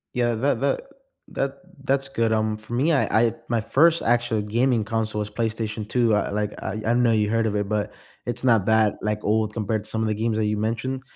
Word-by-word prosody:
Yeah, 120 -1 +1
tha 135 +6 +1
that 140 0 +1 0.5
that 135 0 -2 0.3
that's 135 0 0
good. 115 -4 0
Um, 110 -1 +1
for 110 +2 -10
me, 140 +7 +2
I 140 - +3 0.2
I 115 -1 +2 0.2
my 115 -2 +1
first 165 +9 +3
actual 120 -2 +1
gaming 115 +2 +1
console 110 0 -2
was 105 0 -3
PlayStation 110 -1 -3
2, 120 -3 +2
uh, 105 - +1
like, 105 0 -2
I 100 +3 -4
I 115 - +2
know 120 -1 +3
you 105 -2 +2
heard 115 0 +2
of 105 - -2
it, 105 -1 -1
but 105 0 -1 0.4
it's 120 +1 -2
not 115 -6 +4
that, 110 -2 +3
like, 105 0 -2
old 110 0 +1
compared 110 -1 -2
to - - -10
some 110 - -2
of 110 - 0
the 110 - +1
games 110 +1 -1
that 110 - +1
you 105 0 0
mentioned, 115 +5 -2
110 Hz, 230 wpm, -24 LUFS, 105-120 Hz, 0.5 s, not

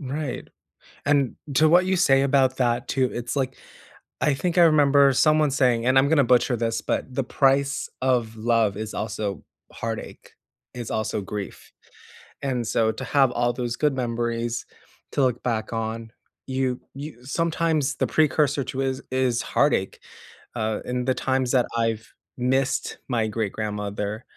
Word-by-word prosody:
Right, 140 0 -4 0.6
and 140 -3 +2 0.2
to 155 +2 +5
what 175 +3 +5
you 190 0 +1
say 135 -7 +4
about 135 -1 +2
that 120 0 0
too, 130 -2 +1
it's 120 +2 -4
like, 130 -2 -2 0.6
I 150 - +2
think 180 +5 -1
I 175 - +8
remember 140 -3 +5
someone 155 +2 +3
saying, 125 -4 +2
and 130 - +3
I'm 135 - +4
gonna 145 -3 +4
butcher 125 0 +3
this, 115 0 -1
but 130 - -3
"The 135 - 0
price 140 +2 +1
of 120 -4 +1
love 110 -3 +1
is 110 0 -5
also 105 -4 -4 0.3
heartache, 115 -1 -6 0.4
is 120 -3 -6
also 110 -1 -1
grief." 100 0 -7 0.7
And 125 -3 -1
so, 110 -1 +2
to - - -7
have 135 -3 +3
all 120 0 +1
those 120 -1 -3
good 150 0 +1
memories 120 -1 -2 0.5
to - - +1
look 125 -2 0
back 115 -2 -2
on, 115 0 -4 0.4
you 130 -1 -1
you 135 -3 -9
sometimes 160 -1 0
the - - 0
precursor 150 -2 +2
to 135 - -3
is 135 0 -2
is 130 -2 +1
heartache, 140 -9 +1 0.6
uh, 110 -2 -1
in 125 0 -2
the 130 - +2
times 130 -1 0
that 125 -2 +3
I've 115 -1 -2 0.2
missed 130 +2 0
my 115 -3 +1
great 110 -2 -2
grandmother 105 0 -4
125 Hz, 160 wpm, -24 LUFS, 115-140 Hz, 0.7 s, I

